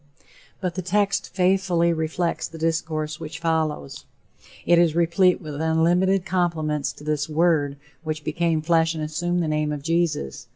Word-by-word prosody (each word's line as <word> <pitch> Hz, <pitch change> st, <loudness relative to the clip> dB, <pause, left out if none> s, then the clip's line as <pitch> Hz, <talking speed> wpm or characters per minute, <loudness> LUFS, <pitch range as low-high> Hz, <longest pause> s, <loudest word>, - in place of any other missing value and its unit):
But 180 Hz, -3 st, -2 dB
the 185 Hz, -, -3 dB
text 200 Hz, +2 st, 0 dB
faithfully 180 Hz, -2 st, +2 dB
reflects 165 Hz, +2 st, -2 dB
the 165 Hz, -, -11 dB
discourse 160 Hz, -1 st, -2 dB
which 155 Hz, 0 st, -7 dB
follows. 155 Hz, -4 st, -2 dB, 0.6 s
It 175 Hz, 0 st, +5 dB
is 165 Hz, -2 st, +3 dB
replete 170 Hz, +2 st, +3 dB
with 155 Hz, -4 st, -6 dB
unlimited 175 Hz, +4 st, +2 dB
compliments 160 Hz, -5 st, 0 dB
to -, -, -14 dB
this 150 Hz, 0 st, -1 dB
Word 155 Hz, -3 st, +2 dB, 0.3 s
which 155 Hz, -1 st, -4 dB
became 160 Hz, +1 st, 0 dB
flesh 165 Hz, 0 st, +2 dB
and 155 Hz, -, -3 dB
assumed 175 Hz, +3 st, -1 dB
the -, -, -1 dB
name 150 Hz, 0 st, 0 dB
of 145 Hz, -2 st, -5 dB
Jesus. 165 Hz, -, -1 dB
165 Hz, 155 wpm, -23 LUFS, 155-175 Hz, 0.6 s, It